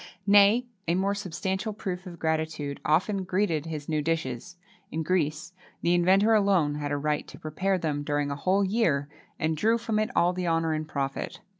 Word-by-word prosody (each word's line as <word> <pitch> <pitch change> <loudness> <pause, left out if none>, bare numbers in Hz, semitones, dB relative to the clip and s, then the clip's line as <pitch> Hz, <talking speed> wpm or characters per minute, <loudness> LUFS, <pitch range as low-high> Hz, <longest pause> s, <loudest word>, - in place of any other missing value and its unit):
Nay, 205 +4 +6 0.2
a 170 - +2
more 195 +2 +1
substantial 190 +2 -3
proof 190 -3 -5
of 175 -1 -9
gratitude 160 -3 -2
often 185 +5 +1
greeted 180 -5 0
his 150 -3 -5
new 155 -1 0
dishes. 165 +1 -3 0.3
In 160 +1 -2
Greece, 160 0 -1 0.3
the 170 - +3
inventor 190 +5 +4
alone 195 -8 +3
had 145 -1 -4
a 145 - 0
right 150 +1 -1
to - - -11
prepare 185 +5 -1
them 150 -4 -2
during 145 0 -1
a - - -2
whole 185 +7 +1
year, 185 -9 +1 0.3
and 160 -1 0
drew 220 +9 +2
from 225 -2 -1
it 215 +1 0
all 175 +1 +3
the 180 -1 -3
honour 165 -1 +1
and 155 0 -3
profit. 140 -2 -4
170 Hz, 185 wpm, -27 LUFS, 150-195 Hz, 0.3 s, Nay